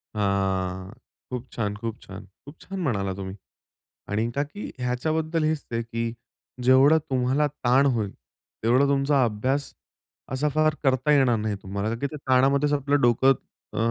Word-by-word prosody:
हां. 95 -2 -1 0.4
खूप 125 0 -5
छान, 105 -3 -2
खूप 115 +1 -5
छान, 100 +2 -10 0.2
खूप 145 +3 -13
छान 195 0 -6
म्हणाला 100 - -1
तुम्ही. 95 0 -6 0.7
आणि 110 +3 0
का 140 - +1
की 205 +9 -8
ह्याच्याबद्दल 155 +6 -1
हेच 155 -1 0
आहे 115 0 -1
की 115 0 -3 0.5
जेवढं 135 +5 +6
तुम्हाला 130 +3 +2
ताण 135 -1 +2
होईल 105 -4 -1 0.5
तेवढं 125 +5 +4
तुमचा 140 -1 +3
अभ्यास 130 +6 -1 0.6
असा 145 +3 +1
फार 155 +1 +2
करता 135 +1 +2
येणार 135 -5 +4
नाही 105 -1 -2
तुम्हाला, 100 +2 -3
का 115 - -1
की 140 - 0
ते - - -6
ताणामध्येचं 140 +2 +3
आपलं 145 0 +1
डोकं 120 +3 +5 0.4
अ, - - -6
130 Hz, 155 wpm, -25 LUFS, 110-145 Hz, 0.7 s, जेवढं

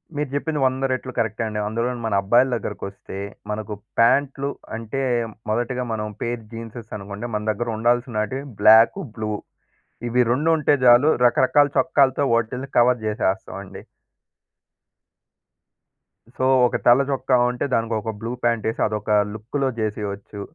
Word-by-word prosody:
మీరు 150 -1 -2
చెప్పింది 150 +1 -2
100 130 +1 0
రెట్లు 130 0 -3
కరెక్టే 115 0 -1
అండి. 105 -1 -4
అందులోను 120 +2 -2
మన 110 - -1
అబ్బాయిల 120 +6 +3
దగ్గరకొస్తే 100 -3 -6 0.3
మనకు 105 0 -4 0.3
పాంట్లు 140 +4 +3 0.3
అంటే 115 +4 -4 0.5
మొదటిగా 120 +2 -1
మనం 105 -1 -3
పేర్ 120 -1 -3
జీన్సేస్ 115 0 -9
అనుకోండి 100 +3 -7
మన 105 - -2
దగ్గర 120 +3 -4
ఉండాల్సినటివి 120 +2 0 0.2
బ్లాకు 115 - +6
బ్లూ. 110 -1 -3 0.8
ఇవి 125 +1 +1
రెండు 150 +6 +1
ఉంటే 150 -1 +2
చాలు 125 +5 +7 0.2
రకరకాల 130 +4 +4
చొక్కాలతో 135 -2 +3
వాటిని 125 +4 -1
కవర్ 120 0 +4
చేసేస్తామండి. 105 -3 -3 2.6
సో 130 - 0 0.2
ఒక - - -4
తెల్ల 120 +3 +6
చొక్క 135 -1 -2 0.2
ఉంటే 125 +2 -2
దానికి 115 -1 0
ఒక 110 - -3
బ్లూ 115 +2 -4
ప్యాంట్ 115 -2 +1
ఏసి 115 - -4
అదొక 105 0 -3 0.2
లుక్కులో 125 +6 -2
చేసేయొచ్చు. 105 -1 -4
120 Hz, 130 wpm, -22 LUFS, 110-130 Hz, 2.6 s, చాలు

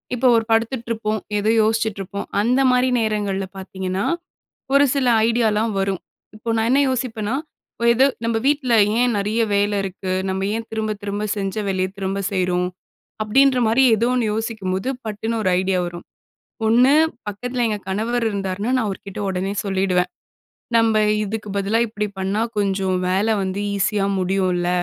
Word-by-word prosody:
இப்போ 250 +1 +2
ஒரு 225 - +3
படுத்துட்ருப்போம், 225 -2 0 0.2
எதோ 210 +2 +2
யோசிச்சுட்ருப்போம். 215 -3 -2
அந்தமாரி 250 +2 +3
நேரங்கள்ல 205 -3 -1
பார்த்தீங்கன்னா, 190 0 -3 0.7
ஒரு 285 +1 +6
சில 265 -2 +1 0.2
ஐடியாலாம் 225 -1 +1
வரும். 195 -1 -1 0.3
இப்போ 220 +2 -6
நான் 225 +1 +1
என்ன 275 - +4
யோசிப்பன்னா, 240 -3 -2 0.4
"இப்ப - - -7
எது 260 +3 +4 0.2
நம்ம 230 -1 +1
வீட்டில 280 -4 +2 0.3
ஏன் 245 -2 +2
நிறைய 210 +3 0
வேலை 205 +1 +1
இருக்கு. 190 0 -4 0.2
நம்ம 190 0 -2
ஏன் 230 - -4
திரும்ப, 220 -1 -2
திரும்ப 205 +1 -2
செஞ்ச 195 0 -2
வேலையத் 185 0 -1
திரும்ப 195 0 -2
செய்றோம்." 180 -1 +1 0.6
அப்படின்றமாரி 250 +1 +4
எதோ 230 +3 +1
ஒண்ணு 245 -2 +1
யோசிக்கும்போது 215 -2 -2 0.2
பட்டுன்னு 220 +2 -3
ஒரு 185 - +2
ஐடியா 190 0 0
வரும். 175 0 -7 0.6
ஒண்ணு 245 +4 +5 0.4
பக்கத்தில 245 +4 -2
எங்க 210 -1 -1
கணவர் 230 +5 -1
இருந்தாருன்னா, 200 +3 -2
நான் 235 - 0
அவர்க்கிட்ட 200 0 -6
உடனே 190 +1 -2
சொல்லிடுவேன். 190 -2 +1 0.7
"நம்ப 225 -1 +3 0.3
இதுக்கு 210 0 -5
பதிலா 205 +4 +1
இப்பிடி 210 -1 -3
பண்ணா 195 +3 -1 0.2
கொஞ்சம் 195 -2 0
வேலை 200 +4 +2
வந்து 190 +1 -2 0.2
ஈஸியாக 200 -1 +1
முடியும்ல. 185 -1 0
210 Hz, 145 wpm, -21 LUFS, 195-230 Hz, 0.7 s, ஒரு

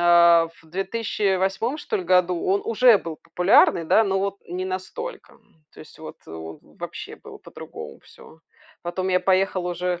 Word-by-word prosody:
а, 170 -1 +6
в - - -21
2008 195 - -1
что - - -3
ль 185 - -4
году; 180 -1 +2
он 195 +2 +1
уже 235 0 +5
был 165 -2 -7
популярный, 175 -2 +3
да, 220 +7 +4
но 195 -1 0
вот 200 0 -2
не 185 +1 -4
настолько, 190 - -6
м. 155 -2 -29
То - - -14
есть, 155 - -15
вот, 155 - -9
э, - - -12
в 80 0 -9 0.2
вообще - - -7
было - - -13
по-другому - - -10
всё. 160 - -17 0.4
Потом 180 +2 -3
я 185 -1 +3
поехала 185 -1 +1
уже. 180 0 -2
185 Hz, 175 wpm, -23 LUFS, 170-195 Hz, 0.4 s, а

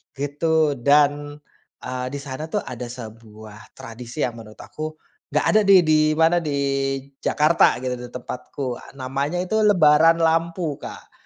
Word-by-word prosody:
gitu, 150 +2 +1
dan, 145 +2 +2 0.5
eee, 125 0 -4
di - - -4
sana 140 +3 -6
tuh, 205 +5 -2
ada 125 0 -7
sebuah 110 -2 -12
tradisi 120 +5 -7
yang 120 -2 -3
menurut 110 -1 -12
aku, 155 0 -7 0.4
nggak - - +2
ada 215 - +5
nih, 190 -3 +7
di 155 -1 +3 0.2
mana, 165 +2 +3
di 150 -4 -3 0.6
Jakarta, 155 +2 +3
gitu, 125 -1 -3
di 125 - -7
tempatku, 125 +1 -6 0.2
namanya 140 +7 -2
itu 220 +4 -1
Lebaran 165 -6 +5
Lampu 165 -1 0
Kak, - - -10
145 Hz, 145 wpm, -22 LUFS, 125-160 Hz, 0.6 s, nih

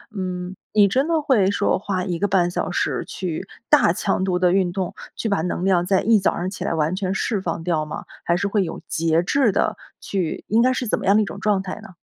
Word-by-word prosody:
嗯， 185 -1 -4 0.2
你 205 -2 +6
真 265 +9 +1
的 320 -3 +1
会 210 -9 +3
说 205 - +1
花 190 -2 -2
1 175 -3 -2
个 205 - +1
半 180 -3 +2
小 180 - -2
时 - - -1
去 185 +1 -4 0.2
大 295 - +5
强 190 +2 -1
度 185 -2 +1
地 180 -1 +3
运 185 -2 +2
动， 185 -1 -3 0.2
去 - - -3
把 200 -6 +1
能 180 +1 -2
量 180 -2 +3
在 190 -1 +3
一 220 -1 +4
早 190 - +1
上 180 - -2
起 190 - -5
来 - - -1
完 160 +3 0
全 190 -1 -2
释 210 -1 -1
放 165 -2 -3
掉 165 -3 0
吗？ - - -7 0.2
还 170 0 +1
是 200 - -1
会 200 -1 +1
有 175 - -5
节 165 +1 +1
制 260 +3 +2
地 - - 0 0.2
去 185 -5 -3
应 225 +3 +4
该 255 +1 +4
是 255 -2 -2
怎 - - 0
么 - - -5
样 200 - +5
的 215 - +4
一 - - -2
种 200 - -7
状 200 -1 +1
态 190 +2 -6
呢？ 220 - -12
190 Hz, 270 characters per minute, -22 LUFS, 175-205 Hz, 0.2 s, 你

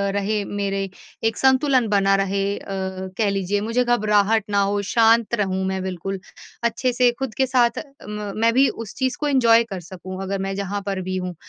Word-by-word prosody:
रहे 205 +1 0
मेरे 195 -1 -2 0.3
एक 225 -1 +1
संतुलन 265 -2 +3
बना 195 -1 +3
रहे 195 +1 0
अ, - - -11 0.5
कह 215 -3 +2
लीजिए 200 +1 -1
मुझे 230 +4 +1
घबराहट 215 -2 +2
ना 200 -1 +2
हो 200 +1 +1
शांत 230 0 +4
रहूँ 190 -3 -1
मैं 190 0 -2
बिल्कुल। 190 +1 -4 0.4
अच्छे 245 +2 0
से 245 0 +4
खुद 265 -4 -3
के 265 - +3
साथ 245 -2 +2 0.3
म 210 -1 -4
मैं 230 0 +4
भी 270 +3 +5
उस 225 -3 -7
चीज़ 260 -1 -1
को 300 - -1
एन्जॉय 235 -5 +5
कर 200 -5 -6
सकूँ 185 +2 -8
अगर 195 +1 -3
मैं 195 0 -2
जहाँ 200 +1 -3
पर 195 -2 -2
भी 185 0 -3
हूँ 180 -1 -4
205 Hz, 195 wpm, -22 LUFS, 195-235 Hz, 0.5 s, भी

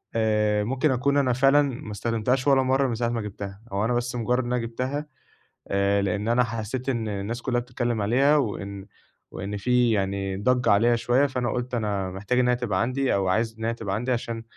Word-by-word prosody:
آآ، 105 -2 +2
ممكن 135 +6 +1
أكون 140 +3 +1
أنا 130 -3 +2
فعلًا 135 +3 +5
ما 130 -6 -4
استخدمتهاش 115 +5 -1
ولا 135 -1 +5
مرة 135 +1 +2
من 120 - -2
ساعة 115 +1 -1
ما 120 -1 -2
جِبتها 100 -1 -7
أو 100 +2 0
أنا 125 - +1
بس 120 +1 -1
مجرد 125 +2 0
إن 125 - -2
أنا 125 - +1
جبتها 130 +6 -3 0.6
آآ، 100 +1 +2
لإن 100 +2 -1
أنا 120 +2 +3
حسيت 115 +3 -4
إن 115 -4 -1
الناس 105 +3 -4
كلها 120 -1 0
بتتكلم 120 -2 -2
عليها، 135 +8 +3
وإن 100 -6 -3 0.5
وإن 100 +2 -5
في 125 +2 +2
يعني 95 -2 -1
ضجة 125 +4 +2
عليها 115 +4 +4
شوية، 120 +4 +2
فأنا 125 -3 -2
قُلت 125 0 -3
أنا 100 -4 -2
محتاج 105 +7 -1
إن 125 - +3
هي 125 - +3
تبقى 115 -6 -1
عندي 130 +3 0
أو 95 -1 0
عايز 110 +4 0
إن 110 - -3
هي 115 - 0
تبقى 105 -4 -3
عندي، 120 +4 -2
عشان 115 -2 -3
115 Hz, 210 wpm, -25 LUFS, 105-125 Hz, 0.6 s, فعلًا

